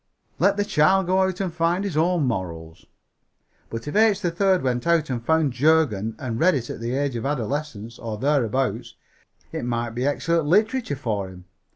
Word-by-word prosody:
Let 200 +3 +3
the 205 - +1
child 190 +2 +3
go 185 +2 +2
out 190 -1 0
and 185 -3 -2
find 170 +3 0
his 195 -6 -3
own 170 +1 +2
morals. 85 -9 -4 0.8
But 115 +4 -6
if 145 - -4
H. 215 -2 +4
3rd 185 +2 +1
went 125 +2 -1
out 165 -4 +2
and 120 -2 -3
found 160 -1 +2
Jurgen 125 -7 +2
and 120 -4 -4
read 180 -1 +4
it 120 -3 -3
at - - -7
the 120 +2 -3
age 140 -2 -1
of 115 - -3
adolescence, 135 -4 -3
or 110 -2 -5
thereabouts, 135 -1 0 0.6
it - - -4
might 120 -1 -2
be 125 +4 -2
excellent 165 +2 0
literature 215 - +2
for 105 -8 -3
him. 90 -1 -13
145 Hz, 185 wpm, -23 LUFS, 115-170 Hz, 0.8 s, H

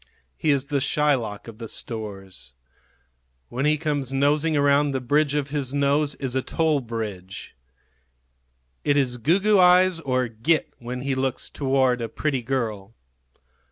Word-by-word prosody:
He 155 - -1
is 140 -2 +2
the 140 0 -1
Shylock 130 -9 0
of 115 -1 -11
the 115 - -6
stores. 95 - -8 0.9
When 130 +4 -2
he 155 0 +3
comes 145 -4 -2
nosing 145 +3 +2
around 145 0 +3
the 130 - 0
bridge 145 +3 +1
of 145 -2 -1
his 140 -2 -2
nose 145 +1 +1
is 130 -3 -4
a 130 - +1
toll 155 +1 +1
bridge. 105 - -6 1.3
It 145 - +2
is 125 -3 +1
goo 160 - +2
goo 210 0 +3
eyes 180 -1 +5
or 130 -5 0
"git" 120 +8 0
when 125 +1 -5
he 135 +1 -1
looks 130 -1 -2
toward 130 -3 +1
a 115 - -3
pretty 140 -1 -1
girl. 115 -4 -3
135 Hz, 155 wpm, -24 LUFS, 120-150 Hz, 1.3 s, eyes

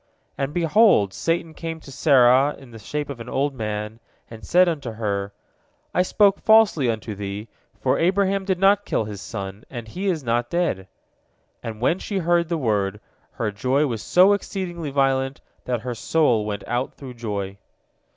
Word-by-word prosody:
And, 135 0 -2
behold, 165 - +4
Satan 165 -1 -1
came 165 0 -6
to 140 - -12
Sarah 135 0 +4
in 135 -3 -15
the 115 - -11
shape 145 +7 -4
of 140 -4 -7
an 115 - -8
old 140 +1 0
man, 105 -2 -4 0.3
and 110 -1 -10
said 180 +1 +4
unto 140 -9 -3
her, 100 -2 -2 0.6
"I - - +3
spoke 200 +2 +3
falsely 220 - +5
unto 110 -1 -3
thee, 100 +2 -6 0.3
for - - +1
Abraham 195 +2 +2
did 190 -1 0
not 195 +2 +4
kill 110 - -1
his 105 -2 -7
son, 100 -1 -6
and 120 -3 -7
he 185 - -4
is 165 -6 0
not 120 0 0
dead," 170 - -1 0.7
and 110 -1 -7
when 165 +9 +2
she 200 - -4
heard 170 -1 +1
the 170 - 0
word, 105 -6 0 0.3
her 115 -4 -2
joy 130 +8 +1
was 115 -6 -3
so 185 +3 +5
exceedingly 175 -5 -4
violent 135 -1 +1 0.3
that 120 -3 -1
her 125 +1 -4
soul 120 -3 +1
went 105 -1 -4
out 125 +2 -2
through 130 -3 -9
joy. 100 -4 -5
135 Hz, 175 wpm, -23 LUFS, 110-170 Hz, 0.7 s, falsely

